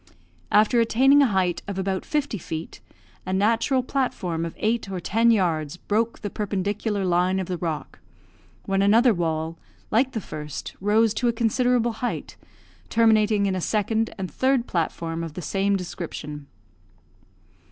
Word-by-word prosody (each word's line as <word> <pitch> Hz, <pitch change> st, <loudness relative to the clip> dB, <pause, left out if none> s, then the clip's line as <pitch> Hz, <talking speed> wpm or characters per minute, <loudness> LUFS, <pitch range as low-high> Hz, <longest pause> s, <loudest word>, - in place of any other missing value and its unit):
After 215 Hz, +3 st, +4 dB
attaining 265 Hz, +5 st, +5 dB
a 275 Hz, -, +5 dB
height 185 Hz, -5 st, 0 dB
of 200 Hz, -2 st, -4 dB
about 190 Hz, 0 st, -2 dB
fifty 290 Hz, -8 st, -1 dB
feet, 160 Hz, 0 st, -6 dB, 0.4 s
a 185 Hz, -, -5 dB
natural 230 Hz, +6 st, +2 dB
platform 190 Hz, -11 st, -2 dB
of 165 Hz, -, -6 dB
eight 220 Hz, -1 st, -1 dB
or 190 Hz, -2 st, -3 dB
ten 225 Hz, +6 st, +2 dB
yards 170 Hz, -7 st, +1 dB
broke 225 Hz, +5 st, -1 dB
the 205 Hz, -, -4 dB
perpendicular 205 Hz, 0 st, -2 dB
line 180 Hz, +1 st, +2 dB
of 190 Hz, -, -2 dB
the 180 Hz, -1 st, -4 dB
rock, 160 Hz, -4 st, -4 dB, 0.7 s
when 195 Hz, 0 st, +1 dB
another 225 Hz, +4 st, +5 dB
wall, 165 Hz, -2 st, -2 dB, 0.3 s
like 255 Hz, +4 st, +2 dB
the 225 Hz, -, -1 dB
first, 150 Hz, -7 st, -7 dB
rose 215 Hz, +2 st, +3 dB
to 245 Hz, -, 0 dB
a -, -, +4 dB
considerable 240 Hz, +1 st, +2 dB
height, 245 Hz, -, -3 dB, 0.5 s
terminating 220 Hz, -2 st, +3 dB
in 195 Hz, -, +1 dB
a 185 Hz, -, -2 dB
second 220 Hz, +3 st, 0 dB
and 185 Hz, -4 st, -4 dB
third 260 Hz, -, +1 dB
platform 165 Hz, -2 st, -2 dB
of 165 Hz, -2 st, -7 dB
the 180 Hz, -, -5 dB
same 195 Hz, +5 st, +1 dB
description. 155 Hz, -5 st, -6 dB
200 Hz, 150 wpm, -24 LUFS, 175-230 Hz, 0.7 s, attaining